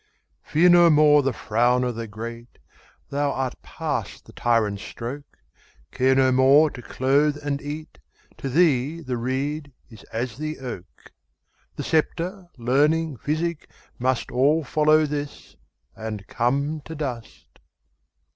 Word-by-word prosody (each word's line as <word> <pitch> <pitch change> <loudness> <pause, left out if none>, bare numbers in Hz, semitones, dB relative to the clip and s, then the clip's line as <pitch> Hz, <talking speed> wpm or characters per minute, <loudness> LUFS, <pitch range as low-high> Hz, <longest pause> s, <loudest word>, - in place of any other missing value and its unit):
Fear 170 +4 +3
no 175 -1 +7
more 150 -1 +6
the 135 0 0
frown 120 +2 +1
o' 125 - 0
the 115 -1 -6
great, 115 +3 -8 0.5
Thou 140 0 0
art 130 -1 -3
past - - -4
the - - -15
tyrant's 110 -4 +1
stroke; 135 +7 -8 0.5
Care 130 +1 +2
no 130 -1 +4
more 135 +4 +5
to 125 - -9
clothe 140 +4 +1
and 140 -1 -1
eat; 155 +2 -7 0.4
To 135 - -4
thee 150 0 +2
the 130 -5 -3
reed 140 +4 -3 0.2
is 110 - -13
as 115 +2 -4
the 155 +1 -4
oak:The 115 -8 -11
sceptre, 175 +4 -1
learning, 145 +5 +1
physic, 155 +6 -3 0.3
mustAll 130 +4 +1
follow 155 +2 +3
this, 145 -1 -6 0.4
and 110 -2 -6
come 140 +8 -1
to 160 - -7
dust. 130 -7 -7
140 Hz, 130 wpm, -24 LUFS, 125-155 Hz, 0.5 s, no